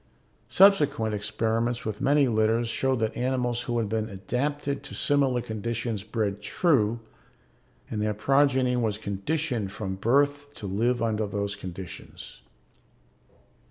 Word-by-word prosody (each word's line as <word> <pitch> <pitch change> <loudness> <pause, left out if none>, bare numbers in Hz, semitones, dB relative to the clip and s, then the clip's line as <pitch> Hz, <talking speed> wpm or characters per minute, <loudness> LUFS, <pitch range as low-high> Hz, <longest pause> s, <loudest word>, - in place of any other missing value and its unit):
Subsequent 150 - +4
experiments 110 +3 -1
with 110 +1 -4
many 140 0 +4
litters 110 +1 +2
showed 130 +2 0
that 110 0 -1
animals 125 -1 0
who 120 0 -2
had 115 -2 0
been 110 +1 -2
adapted 140 +9 -2
to 145 - -9
similar 135 -4 +2
conditions 115 0 -3
bred 105 -2 -2
true 120 - +2 0.9
and 105 - -3
their 105 0 0
progeny 130 +1 +3
was 110 -4 0
conditioned 110 +2 -2
from 105 -3 -4
birth 145 +6 +1
to 105 - -7
live 115 +5 0
under 110 -2 0
those 100 0 -2
conditions. 95 -8 -9
115 Hz, 125 wpm, -27 LUFS, 105-135 Hz, 0.9 s, Subsequent